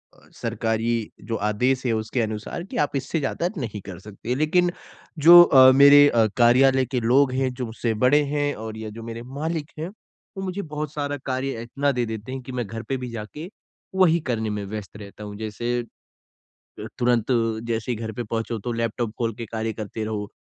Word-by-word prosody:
अ, - - -22
सरकारी 115 0 -2 0.2
जो 115 - 0
आदेश 125 +5 +1
है 120 - +2
उसके 110 +3 -1
अनुसार 110 +9 -4
कि, 195 - -7
"आप 145 -1 0
इससे 145 +4 -1
ज़्यादा 170 +5 -1
नहीं 110 -6 -4
कर 95 -3 -9
सकते।" 105 +5 -5
लेकिन, 175 +4 +2 0.5
जो 175 +3 +10
अ, 130 -5 +7
मेरे 145 +1 +8
अ, 115 -2 +3
कार्यालय 130 +2 +5
के 125 0 -2
लोग 130 +3 +4
हैं, 130 -1 0
जो 125 -1 -4
मुझसे 115 0 -2
बड़े 145 +3 +5
हैं 145 -1 0
और 110 0 -7
या 110 -1 -6
जो 115 - -7
मेरे 115 0 -6 0.2
मालिक 160 -1 -3
हैं, 165 +3 -3
वो 195 -1 -13
मुझे 190 +2 -3
बहुत 150 -2 -5
सारा 145 -1 -3
कार्य 130 -2 -2
इतना 140 +4 0
दे 120 -1 0
देते 110 +2 -6
हैं 130 0 -5
कि 130 - -8
मैं 125 -2 -3
घर 115 +2 -6
पे 135 - 0
भी 125 -1 -6
जाके 115 - -7 0.5
वही 170 -3 +4
करने 110 -3 -1
में 105 -1 -3
व्यस्त 105 0 -7
रहता 105 0 -10
हूँ, 105 0 -7
जैसे 120 +3 -2 1.0
अ, - - -6
तुरंत 120 -2 +2 0.4
जैसे 115 +1 -2
ही - - -1
घर 110 0 -5
पे 120 - -2
पहुँचो, 115 +1 -3
तो 120 +4 -4
लैपटॉप 115 0 -2
खोल 115 -2 0
के 115 - -6
कार्य 110 0 -3
करते 110 0 -5
रहो। 105 -2 -4
120 Hz, 205 wpm, -24 LUFS, 110-140 Hz, 1.0 s, जो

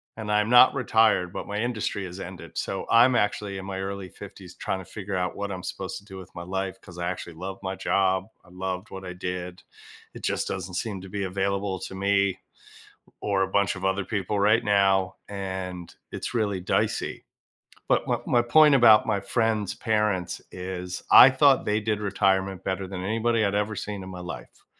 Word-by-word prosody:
and 110 -1 -5
I'm 105 +1 +2
not 125 +1 +8
retired, 110 -8 +2
but - - -5
my 100 +1 -4
industry 110 -4 -2
has 90 +2 -8
ended. 85 -3 -9
So, - - -3
I'm 120 +2 +6
actually 105 -2 0
in 95 - -7
my 95 -1 -5
early 95 -1 -4
50s - - -12
trying 95 - -3
to 95 - -9
figure 100 -1 -5
out 90 -1 -2
what 100 0 -4
I'm 90 -1 -5
supposed 95 -1 -5
to 100 - -13
do 95 -3 -11
with 95 0 -11
my 85 - -7
life, 95 +1 -4
'cause 90 -1 -14
I 85 0 -2
actually 85 -1 -7
love 95 +3 -6
my 95 0 -3
job, 95 0 +1 0.2
I - - -19
loved 95 +2 -5
what 95 0 -7
I 90 - -6
did, 90 0 -5 0.5
it - - -11
just - - -1
doesn't 95 -1 -5
seem 100 -2 -3
to 95 - -10
be 100 0 -3
available 95 0 -1
to 95 - -7
me 100 0 +1 0.8
or 100 -1 0
a 95 - +2
bunch 100 0 +1
of 90 - -8
other 95 0 0
people 100 0 -2
right 110 +4 +4
now, 95 -2 +2
and 95 -3 -6 0.2
it's - - -5
really 100 -4 0
dicey. 90 - -1 0.6
But - - +2
my - - 0
my 120 - +4
point 150 +4 +6
about 110 -4 +7
my 100 -3 0
friend's 110 -2 0
parents 105 -6 0
is 90 -1 -6
I 135 - +10
thought 135 0 +4
they 105 +1 +1
did 105 0 -1
retirement 95 -1 0
better 95 0 -2
than 95 -1 -5
anybody 115 +1 +1
I'd 100 0 0
ever 105 0 -1
seen 100 -2 -5
in 95 - -8
my 90 -1 -8
life, 90 -1 -9
95 Hz, 200 wpm, -26 LUFS, 95-105 Hz, 0.8 s, I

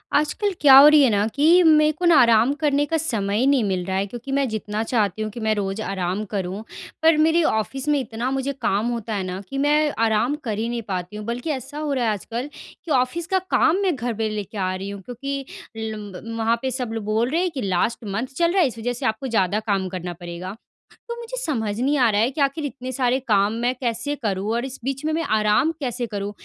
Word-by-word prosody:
आजकल 375 +7 +1
क्या 275 -3 +8
हो 280 - +10
रही 300 -1 +7
है 260 - +5
ना 205 -1 +2
कि 290 +2 +3 0.2
मेरे 305 -1 +5
को 360 - -2
ना 340 -2 +6
आराम 235 +1 +5
करने 290 -1 +2
का 325 - +3
समय 210 -10 -1
ही 260 - +2
नहीं 275 -4 +3
मिल 185 -3 -1
रहा 190 0 -2
है, 195 - 0
क्योंकि 240 +5 -8
मैं 275 0 +1
जितना 215 -1 -3
चाहती 220 -3 0
हूँ 215 - -2
कि 235 - -8
मैं 220 -1 +1
रोज़ 195 +1 -2
आराम 190 0 -2
करूँ, 195 0 -3 0.4
पर 320 -1 +5
मेरे 320 +2 +3
ऑफ़िस 265 +2 -1
में 295 -1 +3
इतना 240 -1 -3
मुझे 270 +1 -1
काम 210 0 +1
होता 230 -2 -4
है 195 - -2
ना 185 0 -4
कि 275 - -5
मैं 295 +2 +2
आराम 225 +5 +1
कर 220 -5 -3
ही 225 +2 -1
नहीं 240 -1 -3
पाती 185 +1 -4
हूँ। 210 - -7
बल्कि 240 +6 -4
ऐसा 275 +1 -6
हो 300 -1 -2
रहा 255 -3 0
है 220 - +2
आजकल 230 +6 -4 0.4
कि 330 - -5
ऑफ़िस 260 +6 0
का 380 - +4 0.2
काम 325 +3 +4
मैं 375 -5 +1
घर 245 -2 -3
पे 220 0 -2
लेके 215 0 -5
आ 185 -1 -1
रही 195 +1 -5
हूँ, 200 -1 -7
क्योंकि 275 +5 -5 0.3
लम्ब 220 0 -6
वहाँ 225 +1 +2
पे 265 - -2
सब 250 -2 -3
लोग 225 -1 -4
बोल 220 +3 0
रहे 325 +5 +1
हैं 365 -1 0
कि 275 -5 -5
लास्ट 200 +4 -1
मंथ 210 +5 -3
चल 340 0 +3
रहा 380 +1 +3
है, 325 - +4
इस 235 - -7
वज़ह 245 +2 -2
से 245 - -5
आपको 265 +5 -1
ज़्यादा 210 -3 +1
काम 195 -2 0
करना 180 -1 -5
पड़ेगा। 175 +3 -7 0.5
तो 470 - -4
मुझे 475 +1 -7
समझ 225 - -2
नहीं 280 +4 +1
आ 245 -3 +5
रहा 205 0 +2
है 230 - +3
कि 285 - -4
आखिर 280 +2 0
इतने 255 -2 -6
सारे 255 0 +1
काम 205 -1 +3
मैं 245 +1 +1
कैसे 245 +3 -2
करूँ 200 -1 -1
और 240 +2 -1
इस 265 0 -8
बीच 270 +2 -3
में 310 - +1
मैं 330 +1 0
आराम 215 +8 +2
कैसे 250 -3 -3
करूँ? 205 -1 -4
235 Hz, 250 wpm, -22 LUFS, 210-280 Hz, 0.5 s, हो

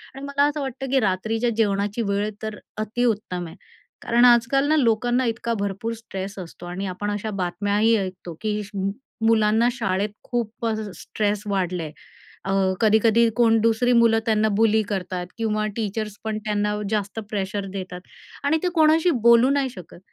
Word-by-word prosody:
आणि 270 - -8
मला 280 0 +1
असं 295 0 -2
वाटतं 270 0 -5
की 270 - +4
रात्रीच्या 220 +4 0
जेवणाची 205 +1 0
वेळ 205 +1 0
तर 215 -1 -4 0.2
अतिउत्तम 215 -5 -1
आहे 165 - -11 0.5
कारण 240 +1 +3
आजकाल 245 +3 +4
ना 310 - +3
लोकांना 245 0 +2
इतका 230 0 -1
भरपूर 200 +3 -2
स्ट्रेस 200 -3 -7
असतो 175 -1 -9
.आणि 180 +3 -4
आपण 205 +3 -3
अशा 205 +1 -3
बातम्याही 205 +5 +1
ऐकतो 185 -3 -5
की 210 -1 -1 0.6
मुलांना 225 +1 +4
शाळेत 210 -5 -1
खूपच 230 -1 -2 0.2
स्ट्रेस 205 -1 -1
वाढला 180 -3 -1
आहे. 155 - -6 0.5
अ, 195 - -1 0.3
कधी-कधी 220 +1 +4
कोण 225 -2 +4
दुसरी 230 +2 +3
मुलं 225 -1 +4
त्यांना 220 -1 +2
बुली 220 -1 +4
करतात 180 -2 -3
किंवा 215 -1 0
टीचर्स 215 -1 -3
पण 220 -1 -2
त्यांना 210 0 0
जास्त 210 0 -2
प्रेशर 200 -1 -3
देतात. 185 -2 -6 0.4
आणि 300 +3 +2
ते 360 - +2
कोणाशी 320 +2 +4 0.2
बोलू 235 +2 +7
नाही 280 -2 +1
शकत. 180 -7 -12
220 Hz, 155 wpm, -23 LUFS, 200-235 Hz, 0.6 s, बोलू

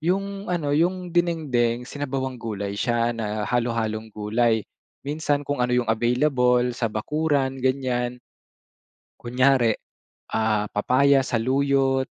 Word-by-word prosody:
Yung 195 +4 -2
ano, 165 -5 -1
'yong 175 +3 0
dinengdeng, 140 -9 +1
sinabawang 130 -2 -4
gulay 100 -3 -4
siya 120 +3 0
na 105 -2 -3
halo-halong 115 -2 -1
gulay. 110 +1 +1 0.4
Minsan 145 0 -1
kung 135 -4 +1
ano 125 - -1
'yong 125 -2 +1
available 125 +1 +2
sa 125 - -2
bakuran, 140 +2 0
ganyan. 125 -2 -1 1.0
Kunyari, 125 -2 +3 0.6
ah, 105 -2 +1
papaya, 135 +5 +3
saluyot, 135 +2 +1
125 Hz, 110 wpm, -24 LUFS, 115-140 Hz, 1.0 s, Kunyari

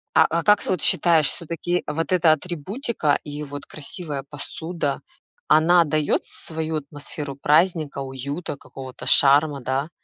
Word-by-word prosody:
А - - +7
а 165 0 0
как 210 0 +4
вот 180 -5 -1
считаешь, 165 -4 +4
всё-таки 175 +1 -2
вот 165 +4 -3
эта 175 -3 +4
атрибутика 175 - -2
и 150 0 -6
вот 145 0 -8
красивая 150 -2 -5
посуда, 150 +1 -4 0.5
она 165 +3 +5
даёт 150 0 0
с - - -9
свою 160 -1 -3
атмосферу 145 -1 -6
праздника, 155 0 +2
уюта, 140 +3 -5
какого-то 130 -2 -10
шарма, 140 0 +5
да? 135 +4 -2
155 Hz, 135 wpm, -23 LUFS, 145-170 Hz, 0.5 s, А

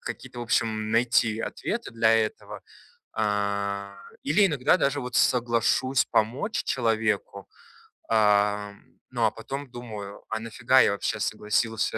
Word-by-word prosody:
Какие-то, 120 - -8
в - - -3
общем, 110 -2 0
найти 115 -1 +2
ответы 230 - -4
для 115 -1 +2
этого, 110 -1 -2 0.5
а. 100 -1 -2 0.3
Или 190 +8 +4
иногда 145 -4 +2
даже 140 -3 0
вот 125 +1 -6
соглашусь 120 +2 +2
помочь 120 - 0
человеку. 110 -5 -1 0.6
А, 105 -1 +2 0.4
ну 120 -3 +1
а 110 - +3
потом 135 +4 -7
думаю: 105 -5 -8
"А 110 - -2
нафига 115 +3 +3
я - - +4
вообще 100 +1 -2
согласился?" 105 +1 -1
110 Hz, 125 wpm, -26 LUFS, 105-125 Hz, 0.6 s, Или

